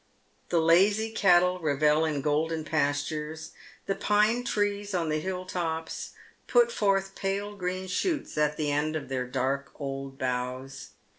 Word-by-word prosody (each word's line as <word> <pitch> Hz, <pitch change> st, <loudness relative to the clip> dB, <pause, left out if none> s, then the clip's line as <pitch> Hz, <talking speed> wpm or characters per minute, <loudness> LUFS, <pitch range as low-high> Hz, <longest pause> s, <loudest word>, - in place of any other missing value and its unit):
The 170 Hz, -, +3 dB
lazy 200 Hz, +7 st, +4 dB
cattle 180 Hz, -3 st, +4 dB
revel 150 Hz, 0 st, +2 dB
in 150 Hz, -3 st, -1 dB
golden 155 Hz, +2 st, 0 dB
pastures; 150 Hz, +1 st, -2 dB, 0.3 s
the 195 Hz, -, 0 dB
pine 210 Hz, +5 st, +2 dB
trees 205 Hz, -3 st, -1 dB
on 165 Hz, -3 st, 0 dB
the 155 Hz, 0 st, 0 dB
hill 185 Hz, +2 st, -4 dB
tcps 165 Hz, -3 st, -4 dB, 0.3 s
put 480 Hz, 0 st, +4 dB
forth 195 Hz, -, +1 dB
pale 200 Hz, +2 st, -3 dB
green 185 Hz, 0 st, -3 dB
shoots 295 Hz, -, -2 dB
at 150 Hz, 0 st, +1 dB
the 150 Hz, -2 st, 0 dB
ends 155 Hz, +2 st, 0 dB
of 145 Hz, -, -8 dB
their 130 Hz, -1 st, -2 dB
dark 135 Hz, +2 st, -1 dB
old 135 Hz, -1 st, -5 dB
boughs. 130 Hz, 0 st, -4 dB
160 Hz, 145 wpm, -28 LUFS, 145-195 Hz, 0.3 s, lazy